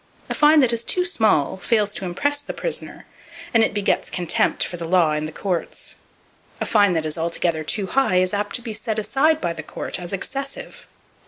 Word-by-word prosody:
A - - -1
fine 300 0 +5
that 245 -3 +3
is 230 0 -1
too 360 +8 +1
small 215 - +2
fails 210 +1 +1
to 195 - -5
impress 285 +11 0
the 290 - -7
prisoner, - - -3 0.5
and 230 -1 +5
it - - +1
begets 205 -1 0
contempt 175 -3 +1
for - - -5
the 170 -1 -6
law 170 -3 +3
and 150 0 -2
the - - -7
courts! 180 +1 -4 0.7
A - - -2
fine 205 -4 +3
that 160 -2 -1
is 155 +1 -3
altogether 165 -1 -1
too 195 +6 -1
high 255 0 +1
is 185 +1 +2
apt 205 0 -1
to 245 - -2
be 225 -3 -5
set 220 0 -4
aside 270 +9 +2
by 170 - -2
the 160 - -6
court 160 - -5
as 175 -1 -5
"excessive." 275 +8 -4
205 Hz, 210 wpm, -22 LUFS, 175-245 Hz, 0.7 s, fine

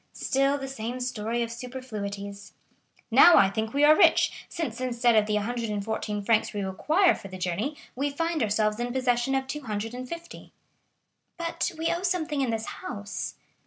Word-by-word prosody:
Still 275 +1 +1
the 270 -1 -5
same 245 -1 -5
story 235 -1 -2
of 230 - -5
superfluities! 210 -5 -6 0.6
Now 350 - +8
I 195 -1 +5
think 220 +2 -2
we 285 +3 +1
are 300 +1 +8
rich, - - +3
since 255 -9 -4
instead 240 -2 +2
of 215 -1 +4
the 210 - 0
114 210 -1 -2
francs 220 +2 +2
we 205 -1 -2
require 310 - +3
for - - -8
the 185 -1 -8
journey 185 - -2 0.2
we 280 +3 0
find 330 +2 -1
ourselves 215 0 +1
in 240 0 -2
possession 255 0 +1
of 265 0 0
250." 255 +4 -6 0.8
"But 335 +2 -2
we 325 +1 0
owe 340 - -3
something 335 -6 0
in 260 - 0
this 225 -1 -2 0.2
house?" 205 0 -5
240 Hz, 160 wpm, -27 LUFS, 210-280 Hz, 0.8 s, Now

